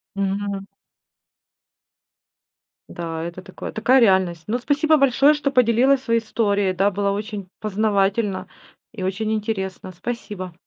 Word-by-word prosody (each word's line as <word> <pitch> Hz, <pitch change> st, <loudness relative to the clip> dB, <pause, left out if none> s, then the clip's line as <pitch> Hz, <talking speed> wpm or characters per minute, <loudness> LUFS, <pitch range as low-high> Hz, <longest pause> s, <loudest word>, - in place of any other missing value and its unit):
Мгм. 200 Hz, 0 st, -2 dB, 2.2 s
Да, 165 Hz, -2 st, -5 dB
это 170 Hz, +2 st, -7 dB
такое, 185 Hz, -1 st, -8 dB
такая 255 Hz, +4 st, +4 dB
реальность. 190 Hz, -6 st, +3 dB
Ну, 240 Hz, -, 0 dB
спасибо 295 Hz, +5 st, +2 dB
большое, 275 Hz, +1 st, +4 dB
что 295 Hz, -2 st, -1 dB
поделилась 255 Hz, +2 st, +3 dB
своей 230 Hz, -3 st, +1 dB
историей, 205 Hz, -3 st, 0 dB
да, 195 Hz, +2 st, +2 dB
было 200 Hz, 0 st, 0 dB
очень 205 Hz, -2 st, -4 dB
познавательно 205 Hz, -1 st, 0 dB, 0.4 s
и 215 Hz, -5 st, -7 dB
очень 205 Hz, +4 st, -1 dB
интересно, 195 Hz, -4 st, -3 dB
спасибо. 190 Hz, -2 st, -6 dB
205 Hz, 120 wpm, -22 LUFS, 190-235 Hz, 2.2 s, такая